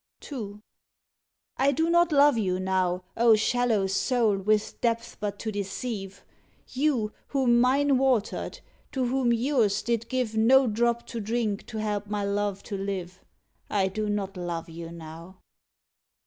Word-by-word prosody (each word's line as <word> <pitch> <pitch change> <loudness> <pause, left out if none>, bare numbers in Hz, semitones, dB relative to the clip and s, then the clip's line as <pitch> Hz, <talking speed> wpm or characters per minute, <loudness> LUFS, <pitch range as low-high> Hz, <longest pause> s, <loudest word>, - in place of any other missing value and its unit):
II. 210 -6 -6 1.0
I 275 +1 +3
do 320 +4 +1
not 345 0 +4
love 290 -1 +5
you 185 -5 0
now, 185 -1 0
O 230 -1 +6
shallow 225 -2 +1
soul, 215 +3 +1
with 210 +2 0
depths 230 -1 -1
but 205 0 -3
to 220 - -4
deceive! 200 0 -5 0.4
You, 255 -6 0
whom 245 -4 +3
mine 270 +1 +3
watered; 255 -6 0 0.3
to 260 -2 0
whom 250 -1 +1
yours 235 -4 +1
did 235 -1 -1
give 250 -4 -1
No 260 +5 +5
drop 235 +1 0
to 230 - -6
drink 220 -1 -2
to 220 - -6
help 210 -1 -2
my 205 0 -2
love 200 -1 -1
to 205 - -5
live 190 -2 -5 0.5
I 195 -2 +1
do 210 +2 -3
not 200 -1 -2
love 175 -2 -4
you 165 0 -8
now. 165 +2 -10
215 Hz, 150 wpm, -27 LUFS, 195-245 Hz, 1.0 s, O